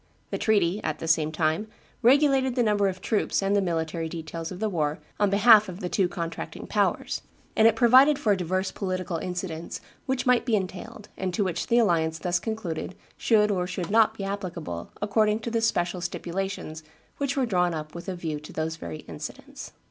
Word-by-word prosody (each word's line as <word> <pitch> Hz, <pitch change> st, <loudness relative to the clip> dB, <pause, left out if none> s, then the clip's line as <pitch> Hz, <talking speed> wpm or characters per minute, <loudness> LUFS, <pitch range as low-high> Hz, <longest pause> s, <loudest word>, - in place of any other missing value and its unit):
The -, -, -2 dB
treaty, 205 Hz, -2 st, +2 dB
at 155 Hz, -1 st, -2 dB
the 165 Hz, -, -6 dB
same 155 Hz, -1 st, +2 dB
time, 155 Hz, +6 st, 0 dB, 0.3 s
regulated 265 Hz, 0 st, +4 dB
the 245 Hz, -, +3 dB
number 205 Hz, -2 st, +2 dB
of 185 Hz, -1 st, -4 dB
troops 210 Hz, -2 st, 0 dB
and 195 Hz, +1 st, +2 dB
the 200 Hz, -, +3 dB
military 165 Hz, -2 st, -2 dB
details 165 Hz, 0 st, -6 dB
of 185 Hz, -, -7 dB
the 220 Hz, -, 0 dB
war 155 Hz, -6 st, -1 dB, 0.2 s
on 205 Hz, -1 st, +3 dB
behalf 210 Hz, +1 st, +6 dB
of 180 Hz, 0 st, -7 dB
the 180 Hz, -4 st, -3 dB
two 190 Hz, -1 st, +2 dB
contracting 170 Hz, -1 st, -5 dB
powers, -, -, 0 dB, 0.3 s
and 220 Hz, -, +6 dB
it 225 Hz, -, +4 dB
provided 260 Hz, +5 st, +6 dB
for 210 Hz, -6 st, +2 dB
divers 185 Hz, +1 st, -1 dB
political 185 Hz, -3 st, -3 dB
incidents 175 Hz, -1 st, -5 dB, 0.3 s
which 260 Hz, -1 st, -1 dB
might 250 Hz, -2 st, +4 dB
be 235 Hz, -2 st, +1 dB
entailed, 195 Hz, +2 st, -5 dB
and 185 Hz, -1 st, -2 dB
to 210 Hz, -, +1 dB
which 175 Hz, -3 st, -2 dB
the 235 Hz, -, +3 dB
alliance 165 Hz, -8 st, +2 dB
thus 175 Hz, +1 st, 0 dB
concluded 185 Hz, -6 st, -4 dB, 0.2 s
should 210 Hz, -2 st, +3 dB
or 180 Hz, -2 st, 0 dB
should 180 Hz, -1 st, -4 dB
not 220 Hz, 0 st, +4 dB
be 195 Hz, -, -4 dB
applicable 185 Hz, -, -5 dB
according 210 Hz, +1 st, +2 dB
to 235 Hz, -, -4 dB
the 230 Hz, 0 st, +1 dB
special 175 Hz, -5 st, 0 dB
stipulations 175 Hz, -2 st, -4 dB, 0.4 s
which 280 Hz, 0 st, -1 dB
were 265 Hz, -, +2 dB
drawn 180 Hz, -6 st, +1 dB
up 155 Hz, -1 st, -6 dB
with 170 Hz, +3 st, -7 dB
a 185 Hz, -, -3 dB
view 160 Hz, -4 st, -4 dB
to 150 Hz, -, -11 dB
those 160 Hz, +1 st, -3 dB
very 85 Hz, -, -7 dB
incidents. -, -, -9 dB
185 Hz, 195 wpm, -26 LUFS, 170-215 Hz, 0.4 s, behalf